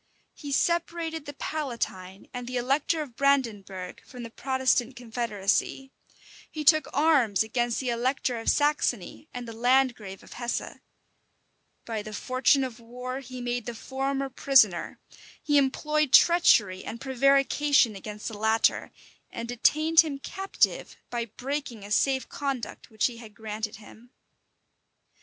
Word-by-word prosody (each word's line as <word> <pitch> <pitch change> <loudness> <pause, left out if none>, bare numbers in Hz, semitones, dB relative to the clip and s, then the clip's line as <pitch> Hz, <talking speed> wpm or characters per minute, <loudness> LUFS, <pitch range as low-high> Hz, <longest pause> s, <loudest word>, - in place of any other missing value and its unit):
He 290 -2 -8
separated 330 0 0
the 290 - -6
Palatine 230 -12 -4
and 245 -1 -6
the 250 0 -3
elector 280 +6 +1
of 255 -6 -13
Brandenburgh 210 -10 -1
from 250 -1 -10
the 230 - -8
Protestant 260 -1 0
confederacy: 235 +1 -2 0.6
he 310 -1 -5
took 310 -1 +5
arms 270 -9 +3
against 240 +1 -1
the 260 - -2
elector 245 0 -1
of 225 - -1
Saxony 290 - 0
and 245 -1 -7
the 230 - -7
landgrave 240 -4 +1
of - - -13
Hesse: 240 0 -4 1.1
by 225 -2 -3
the 215 +1 -9
fortune 255 +5 +2
of 250 -2 -5
war 250 +3 -6
he 255 -1 -8
made 245 -1 -3
the 240 - -4
former 270 +3 -2
prisoner: 230 -10 +3 0.4
he 290 -1 +3
employed 300 +1 0
treachery 215 - +5
and 230 - -7
prevarication 275 -1 +3
against 210 +2 -7
the 225 - -5
latter, 220 +2 +1 0.4
and 230 - -6
detained 310 +7 +3
him 310 -4 +4
captive, 385 +7 -1
by 240 -1 -2
breaking 250 -1 -5
a 205 - -10
safe 265 +3 +2
conduct 275 -5 -5
which 220 -2 0
he 240 -2 -1
had 220 -3 -12
granted 215 0 -5
him. 220 +3 -15
250 Hz, 140 wpm, -27 LUFS, 225-275 Hz, 1.1 s, took